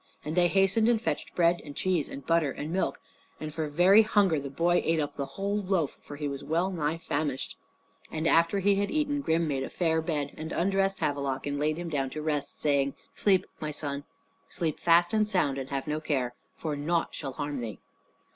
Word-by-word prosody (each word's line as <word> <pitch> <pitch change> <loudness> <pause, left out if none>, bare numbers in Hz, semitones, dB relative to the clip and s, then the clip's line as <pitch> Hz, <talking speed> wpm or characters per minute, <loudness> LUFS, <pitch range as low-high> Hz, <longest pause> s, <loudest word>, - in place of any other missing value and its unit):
And 155 +2 -3
they 175 -1 +5
hastened 195 +5 +3
and 235 -2 +3
fetched 230 - -3
bread 170 0 +3
and 145 -1 -9
cheese 180 -6 0
and 140 - -8
butter 165 -3 +3
and 150 +5 -5
milk; 190 - 0 0.4
and 155 -1 -5
for 160 -1 -2
very 180 +8 +6
hunger 200 -7 +3
the 140 0 -5
boy 170 +5 +2
ate 165 0 +2
up 145 -1 -2
the 140 -1 -3
whole 200 +1 0
loaf, 185 -7 +1
for 145 - -9
he 145 0 -3
was 140 -1 -5
well 170 +4 0
nigh 160 -2 -1
famished. 145 -4 -2 0.5
And 155 +1 -3
after 170 +4 +4
he 200 +1 +4
had 200 0 0
eaten, 295 -2 0
Grim 165 - +1
made 135 -3 -1
a 135 - -3
fair 160 -2 +1
bed 150 -3 -2
and 160 +1 -6
undressed 195 +1 +1
Havelok 140 -2 -1
and 145 0 -2
laid 155 +1 +1
him 175 -1 -4
down 135 -4 -1
to 155 - -5
rest, 150 -2 -2
saying, 140 -2 +1 0.2
"Sleep, 195 -3 +3
my 155 - -3
son; 145 -1 -4 0.5
sleep 160 -3 -2
fast 175 +1 +4
and 215 -1 +2
sound 145 -9 +1
and 135 0 -6
have 135 -1 -2
no 150 0 -1
care, 130 -6 -1 0.2
for 155 -2 -3
nought 165 +4 0
shall 135 -3 -5
harm 145 -1 -3
thee." 110 -3 -5
160 Hz, 215 wpm, -28 LUFS, 145-180 Hz, 0.5 s, very